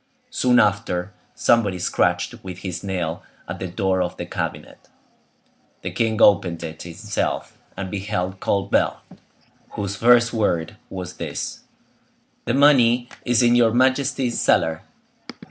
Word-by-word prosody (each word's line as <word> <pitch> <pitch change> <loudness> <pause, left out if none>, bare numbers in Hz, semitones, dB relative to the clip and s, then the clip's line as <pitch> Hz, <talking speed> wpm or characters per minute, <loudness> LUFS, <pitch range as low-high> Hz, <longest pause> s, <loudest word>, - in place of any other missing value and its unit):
Soon 125 - +3
after, 100 -2 0 0.2
somebody 105 -6 +2
scratched 90 - 0
with 90 -2 -7
his 90 -2 -4
nail 90 -4 -3 0.3
at - - -6
the 95 - -3
door 95 0 0
of 90 - -3
the - - -5
cabinet. - - -6 0.9
The - - -3
king 110 -2 0
opened 85 -4 +4
it 80 -1 -7
himself, 85 -1 -3 0.2
and 95 -1 -5
beheld 95 -2 -3
Colbert, 100 0 +1 0.8
whose 100 -1 -3
first 120 0 +5
word 85 -8 0
was 90 -1 -7
this:—"The 120 - -7
money 125 -4 +4 0.2
is 120 0 +3
in 120 0 +5
your 120 -2 +4
majesty's 130 -1 +1
cellar." 80 0 +2
100 Hz, 125 wpm, -22 LUFS, 90-120 Hz, 0.9 s, first